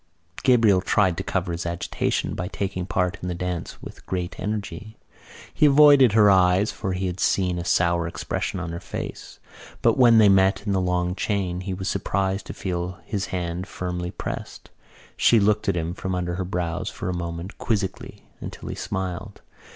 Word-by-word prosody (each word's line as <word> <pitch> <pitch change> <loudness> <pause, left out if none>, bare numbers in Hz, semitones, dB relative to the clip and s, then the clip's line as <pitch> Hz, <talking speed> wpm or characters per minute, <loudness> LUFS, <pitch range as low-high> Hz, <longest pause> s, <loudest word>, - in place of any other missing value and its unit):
Gabriel 115 -7 +4
tried 95 -2 +2
to 95 - -4
cover 95 -2 -2
his 85 0 -3
agitation 85 0 -2
by 90 - -3
taking 95 -2 -3
part 90 -2 -1
in 90 - -4
the 90 - -2
dance 90 -1 -4
with - - -10
great 90 -1 -3
energy. 105 0 -5 0.6
He 150 - +4
avoided 140 -5 +7
her 105 -2 +6
eyes 95 +2 +4
for 95 - -3
he 95 +1 -2
had 90 0 -3
seen 90 -2 +1
a - - -3
sour 85 -1 +2
expression 85 +2 -3
on 85 -2 -4
her 85 - -5
face. 95 - -7 0.5
But - - +3
when 120 -2 +7
they 110 -2 +7
met 95 +1 +3
in 100 - -1
the 95 - +1
long 90 0 0
chain 95 -3 -2
he 95 0 -4
was 95 +1 -5
surprised 95 0 -1
to - - -6
feel 90 -1 -3
his 100 -3 -3
hand 90 0 -3
firmly 90 -1 -4
pressed. 90 - -7 0.5
She 115 - +5
looked 105 0 +2
at 95 - +1
him 85 +1 -2
from 95 0 -3
under 90 -1 -2
her 90 +1 -3
brows 85 -2 -2
for - - -6
a 90 - -1
moment 85 +2 -5
quizzically 100 -4 -3 0.2
until - - -7
he - - -4
smiled. 95 +1 -5
95 Hz, 185 wpm, -24 LUFS, 90-100 Hz, 0.6 s, avoided